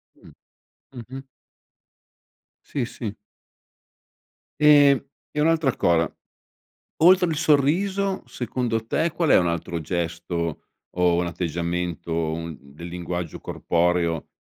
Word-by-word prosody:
Mh. -, -, -17 dB, 0.6 s
Mh-mh. 130 Hz, +2 st, -9 dB, 1.4 s
Sì, 135 Hz, -4 st, -3 dB
sì. 110 Hz, -4 st, -6 dB, 1.5 s
Ehm, 145 Hz, -2 st, +7 dB, 0.3 s
e 150 Hz, -, -2 dB
un'altra 155 Hz, -4 st, +2 dB
cosa 85 Hz, -1 st, +1 dB, 0.9 s
oltre 180 Hz, +1 st, +6 dB
il 160 Hz, -, -1 dB
sorriso 180 Hz, +6 st, +2 dB
secondo 115 Hz, -2 st, -3 dB
te 165 Hz, +7 st, +1 dB
qual 170 Hz, -3 st, 0 dB
è -, -, +7 dB
un 85 Hz, -1 st, +2 dB
altro 85 Hz, 0 st, -3 dB
gesto 85 Hz, -1 st, -3 dB, 0.3 s
o 90 Hz, -1 st, +3 dB
un 90 Hz, 0 st, 0 dB
atteggiamento 85 Hz, 0 st, -3 dB, 0.2 s
un 80 Hz, -2 st, -5 dB
del 70 Hz, +5 st, -12 dB
linguaggio 90 Hz, -1 st, -5 dB
corporeo 85 Hz, -2 st, 0 dB
90 Hz, 105 wpm, -24 LUFS, -, 1.5 s, Ehm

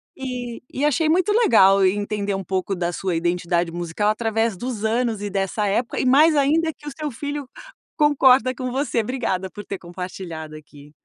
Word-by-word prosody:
E 250 Hz, -3 st, -5 dB
e 275 Hz, -, -1 dB
achei 310 Hz, +2 st, +2 dB
muito 370 Hz, +5 st, +2 dB
legal 195 Hz, -, +5 dB
e 185 Hz, -, +4 dB
entender 205 Hz, 0 st, -2 dB
um 195 Hz, -, -4 dB
pouco 190 Hz, +2 st, -2 dB
da 175 Hz, -1 st, -2 dB
sua 180 Hz, -1 st, -2 dB
identidade 175 Hz, 0 st, 0 dB
musical 175 Hz, +4 st, -2 dB
através 225 Hz, 0 st, 0 dB
dos 225 Hz, +1 st, -4 dB
anos 225 Hz, -1 st, 0 dB
e 205 Hz, -, -3 dB
dessa 195 Hz, +2 st, -1 dB
época 230 Hz, +5 st, -1 dB
e -, -, 0 dB
mais 300 Hz, +5 st, +5 dB
ainda 315 Hz, +4 st, +2 dB
que 295 Hz, -, -15 dB
o -, -, -4 dB
seu 305 Hz, -2 st, -3 dB
filho 285 Hz, +3 st, -5 dB, 0.5 s
concorda 265 Hz, -4 st, +4 dB
com 255 Hz, 0 st, -4 dB
você. 270 Hz, -2 st, 0 dB
Obrigada 220 Hz, -6 st, -2 dB
por 205 Hz, -, -9 dB
ter 195 Hz, -, -5 dB
compartilhado 175 Hz, -3 st, -7 dB
aqui. 150 Hz, -1 st, -14 dB
220 Hz, 185 wpm, -22 LUFS, 185-265 Hz, 0.5 s, legal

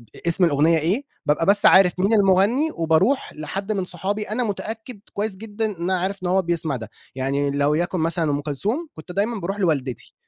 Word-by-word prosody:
أ -, -, -10 dB
اسم 170 Hz, +2 st, +3 dB
الأغنية 160 Hz, +2 st, +3 dB
إيه 185 Hz, -, 0 dB, 0.2 s
بابقى 150 Hz, +3 st, +1 dB
بس 200 Hz, +1 st, +4 dB
عارف 190 Hz, -1 st, +7 dB
مين 200 Hz, +4 st, +2 dB
المغني 205 Hz, +8 st, +3 dB
وباروح 170 Hz, -, +1 dB
لحد 195 Hz, +7 st, -5 dB
من 195 Hz, -3 st, -1 dB
صحابي 195 Hz, +5 st, -3 dB
أنا 235 Hz, +4 st, -1 dB
متأكد 220 Hz, +1 st, -5 dB
كويس 205 Hz, -1 st, -2 dB
جدًا 220 Hz, +1 st, -4 dB
إن 210 Hz, -, -2 dB
أنا 185 Hz, 0 st, +1 dB
عارف 190 Hz, +1 st, -3 dB
إن -, -, -1 dB
هو 190 Hz, +2 st, +3 dB
بيسمع 165 Hz, -4 st, -1 dB
ده، 110 Hz, -3 st, -7 dB, 0.3 s
يعني 140 Hz, +2 st, -1 dB
لو 145 Hz, +1 st, +1 dB
يكن 175 Hz, +2 st, -1 dB
مثلًا 165 Hz, -1 st, 0 dB
أم 145 Hz, 0 st, -1 dB
كلثوم 205 Hz, -, -2 dB
كنت 165 Hz, +3 st, -10 dB
دايمًا 210 Hz, +4 st, -1 dB
باروح 195 Hz, +3 st, -4 dB
لوالدتي، 140 Hz, -, -1 dB
185 Hz, 200 wpm, -22 LUFS, 160-205 Hz, 0.3 s, عارف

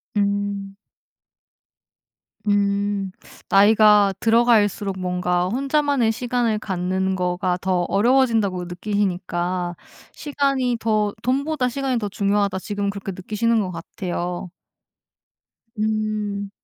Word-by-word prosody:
음. 200 Hz, -1 st, -1 dB, 1.7 s
음. 200 Hz, -1 st, +1 dB, 0.4 s
나이가 210 Hz, 0 st, +6 dB
들어갈수록 220 Hz, -4 st, +3 dB
뭔가 180 Hz, 0 st, 0 dB
혼자만의 275 Hz, -1 st, +1 dB
시간을 235 Hz, -2 st, -1 dB
갖는 190 Hz, -1 st, -1 dB
거가 180 Hz, 0 st, -1 dB
더 185 Hz, -1 st, +1 dB
어려워진다고 220 Hz, -4 st, +2 dB
느끼시니까 180 Hz, -2 st, -2 dB, 0.4 s
'시간이 275 Hz, -4 st, 0 dB
더 215 Hz, -2 st, +1 dB
돈보다 275 Hz, +1 st, 0 dB
시간이 260 Hz, 0 st, -1 dB
더 210 Hz, -, -3 dB
중요하다.' 200 Hz, -1 st, 0 dB
지금 205 Hz, 0 st, -3 dB
그렇게 200 Hz, -1 st, -5 dB
느끼시는 215 Hz, +5 st, 0 dB
거 185 Hz, -3 st, -2 dB
같아요. 175 Hz, +1 st, -5 dB, 1.3 s
음. 215 Hz, -2 st, -1 dB
205 Hz, 230 characters per minute, -22 LUFS, 190-225 Hz, 1.7 s, 나이가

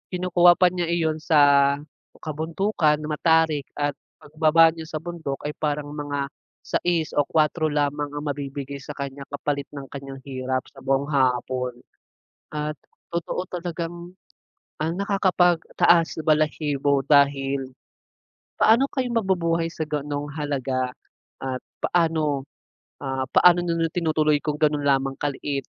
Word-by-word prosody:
Kinukuha 175 Hz, -1 st, +4 dB
pa 180 Hz, -, +6 dB
niya 175 Hz, -1 st, -1 dB
iyon 160 Hz, -2 st, 0 dB
sa 140 Hz, -3 st, +5 dB, 0.4 s
kabundukan, 160 Hz, +1 st, 0 dB
matarik, 160 Hz, -1 st, +2 dB, 0.2 s
at 145 Hz, -1 st, 0 dB, 0.2 s
pagbaba 155 Hz, +2 st, +4 dB
niya 165 Hz, -, -7 dB
sa 155 Hz, 0 st, -5 dB
bundok 160 Hz, -4 st, -5 dB
ay 150 Hz, -, -5 dB
parang 150 Hz, -1 st, -2 dB
mga 145 Hz, -1 st, -3 dB, 0.3 s
6 170 Hz, -3 st, -1 dB
o 145 Hz, -, +4 dB
4 155 Hz, +1 st, +1 dB
lamang 145 Hz, 0 st, -1 dB
ang 145 Hz, +1 st, -5 dB
mabibigay 140 Hz, -1 st, -4 dB
sa 140 Hz, +1 st, -8 dB
kanya 140 Hz, -1 st, -6 dB
kapalit 140 Hz, 0 st, -2 dB
ng 140 Hz, -2 st, -8 dB
kanyang 135 Hz, -1 st, -8 dB
hirap 130 Hz, -1 st, -3 dB
sa 135 Hz, -, -15 dB
buong 135 Hz, +1 st, +1 dB
hapon. 125 Hz, -3 st, 0 dB, 0.7 s
At 150 Hz, 0 st, -3 dB, 0.4 s
totoo 170 Hz, +2 st, -2 dB
talagang, 175 Hz, +1 st, -5 dB, 0.6 s
ang 160 Hz, +2 st, -1 dB
nakakapag 185 Hz, -2 st, +2 dB, 0.2 s
taas 170 Hz, -1 st, +4 dB
balahibo 150 Hz, -2 st, +1 dB
dahil 140 Hz, -2 st, +3 dB, 0.9 s
paano 225 Hz, +4 st, +5 dB
kayo 260 Hz, -2 st, -1 dB
mabubuhay 170 Hz, -6 st, +1 dB
sa 155 Hz, -2 st, -4 dB
ganung 145 Hz, -1 st, -3 dB
halaga? 135 Hz, -4 st, -2 dB, 0.5 s
At 130 Hz, -1 st, -4 dB, 0.2 s
paano 160 Hz, -5 st, +1 dB, 0.6 s
ah, 135 Hz, -1 st, -2 dB
paano 175 Hz, 0 st, +6 dB
niyo 165 Hz, -1 st, 0 dB
na 165 Hz, -, +1 dB
tinutuloy 155 Hz, -3 st, +2 dB
kung 150 Hz, +1 st, -4 dB
ganun 150 Hz, -1 st, +2 dB
lamang 135 Hz, -1 st, +1 dB
kaliit 140 Hz, -1 st, -3 dB
150 Hz, 130 wpm, -24 LUFS, 140-165 Hz, 0.9 s, pa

